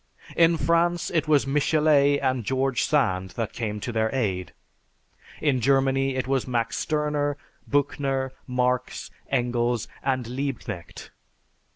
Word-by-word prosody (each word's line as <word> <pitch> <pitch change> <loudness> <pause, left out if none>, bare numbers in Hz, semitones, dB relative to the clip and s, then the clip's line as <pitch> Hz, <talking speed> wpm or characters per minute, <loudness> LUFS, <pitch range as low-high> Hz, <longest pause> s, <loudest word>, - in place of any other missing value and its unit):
In 165 0 +5
France 170 +1 +1
it 160 -3 0
was 150 -3 +4
Michelet 145 0 +3
and 130 -2 +1
George 130 +2 0
Sand 95 - +1
that 115 -3 -2
came 105 -3 -3
to 120 - -3
their 110 -1 +1
aid. 95 -8 -1 0.9
In 140 -5 +1
Germany 135 +1 +2
it 130 - -1
was 135 -1 0
Max 120 -2 -1
Sterner, 150 -2 0 0.3
Büchner, 140 -2 0 0.2
Marx, 125 0 -1 0.2
Engels, 120 -2 0
and 130 -2 0
Liebknecht. 125 - -5
135 Hz, 125 wpm, -25 LUFS, 120-145 Hz, 0.9 s, In